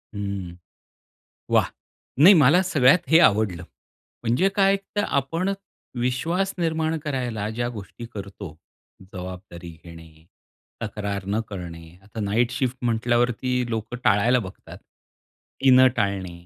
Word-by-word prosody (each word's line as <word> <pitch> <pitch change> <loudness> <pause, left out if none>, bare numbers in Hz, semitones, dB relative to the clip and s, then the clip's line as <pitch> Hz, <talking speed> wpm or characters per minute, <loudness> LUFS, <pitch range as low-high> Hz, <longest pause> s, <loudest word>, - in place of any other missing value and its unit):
हं, 100 -3 -4 1.0
वाह! - - +4 0.5
नाही 180 +8 +9
मला 155 +3 +5
सगळ्यात 150 -3 +4
हे 160 - +7
आवडलं. 100 - +3 0.6
म्हणजे 120 +12 +2
काय 195 -1 +4 0.2
तर 205 - +1
आपण 165 +7 -1 0.5
विश्वास 165 +11 -1
निर्माण 160 -1 0
करायला 125 -7 -3
ज्या 120 +2 -2
गोष्टी 115 +1 -9
करतो, 100 -5 -8 0.5
जबाबदारी 90 -2 -9
घेणे, 80 -2 -14 0.6
तक्रार 100 -2 -4
न 105 +2 0
करणे, 85 -4 -8
आता 105 +3 -10
नाईट 110 +4 +1
शिफ्ट 125 0 -2
म्हटल्यावरती 120 +1 0
लोकं 115 +1 -4
टाळायला 115 +5 +3
बघतात. 95 -4 -10
ती 135 - -6
न 130 0 +7
टाळणे, 95 -5 -3
115 Hz, 115 wpm, -24 LUFS, 100-130 Hz, 1.0 s, नाही